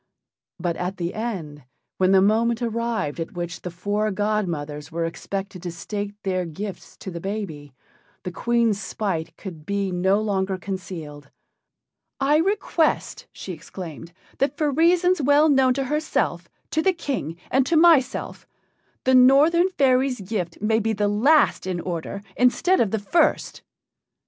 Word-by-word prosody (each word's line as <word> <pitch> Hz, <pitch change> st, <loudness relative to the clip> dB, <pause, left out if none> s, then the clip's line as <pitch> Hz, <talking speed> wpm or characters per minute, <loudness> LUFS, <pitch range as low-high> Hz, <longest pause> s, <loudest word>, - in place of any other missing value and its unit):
But 175 Hz, -2 st, -2 dB
at 180 Hz, +2 st, -3 dB
the 175 Hz, -1 st, -3 dB
end, 175 Hz, -, -5 dB, 0.4 s
when 185 Hz, 0 st, +4 dB
the 190 Hz, -1 st, +6 dB
moment 230 Hz, +3 st, +2 dB
arrived 230 Hz, -9 st, -2 dB
at 165 Hz, -, -4 dB
which 175 Hz, -1 st, -5 dB
the 180 Hz, -, -5 dB
four 205 Hz, +5 st, -1 dB
godmothers 175 Hz, -8 st, -2 dB
were 165 Hz, +1 st, -1 dB
expected 195 Hz, +2 st, -5 dB
to 175 Hz, -1 st, -5 dB
state 205 Hz, +4 st, -5 dB
their 185 Hz, -2 st, 0 dB
gifts 180 Hz, +3 st, -7 dB
to 190 Hz, -, -6 dB
the 170 Hz, -1 st, -6 dB
baby, 165 Hz, -9 st, -5 dB, 0.5 s
the 180 Hz, -, -4 dB
Queen's 230 Hz, +1 st, +1 dB
spite 165 Hz, -6 st, -3 dB
could 170 Hz, -6 st, -9 dB
be 200 Hz, +2 st, -2 dB
no 190 Hz, +3 st, +2 dB
longer 195 Hz, -3 st, -1 dB
concealed. 165 Hz, -7 st, -7 dB, 0.9 s
"I 280 Hz, +2 st, +3 dB
request," 350 Hz, -2 st, 0 dB
she 185 Hz, -, -7 dB
exclaimed, 165 Hz, 0 st, -9 dB, 0.3 s
"that 275 Hz, +1 st, 0 dB
for 300 Hz, -2 st, +1 dB
reasons 345 Hz, +3 st, +3 dB
well 290 Hz, +3 st, +4 dB
known 265 Hz, -3 st, +4 dB
to 275 Hz, -, 0 dB
herself, 300 Hz, +4 st, -1 dB, 0.2 s
to 315 Hz, -, +1 dB
the 380 Hz, +2 st, +3 dB
King, 260 Hz, -, -4 dB
and 265 Hz, +1 st, +4 dB
to 335 Hz, -, +3 dB
myself, 320 Hz, -6 st, +3 dB, 0.6 s
the 260 Hz, -, +3 dB
Northern 290 Hz, +8 st, +6 dB
fairy's 260 Hz, -, +2 dB
gift 185 Hz, -4 st, -4 dB
may 220 Hz, +2 st, +2 dB
be 225 Hz, 0 st, 0 dB
the 205 Hz, 0 st, 0 dB
last 265 Hz, +2 st, +3 dB
in 180 Hz, -2 st, -2 dB
order 175 Hz, +3 st, -5 dB
instead 345 Hz, +9 st, +3 dB
of 225 Hz, -, +2 dB
the 220 Hz, -, -1 dB
first." 220 Hz, -, +1 dB
205 Hz, 150 wpm, -23 LUFS, 180-260 Hz, 0.9 s, the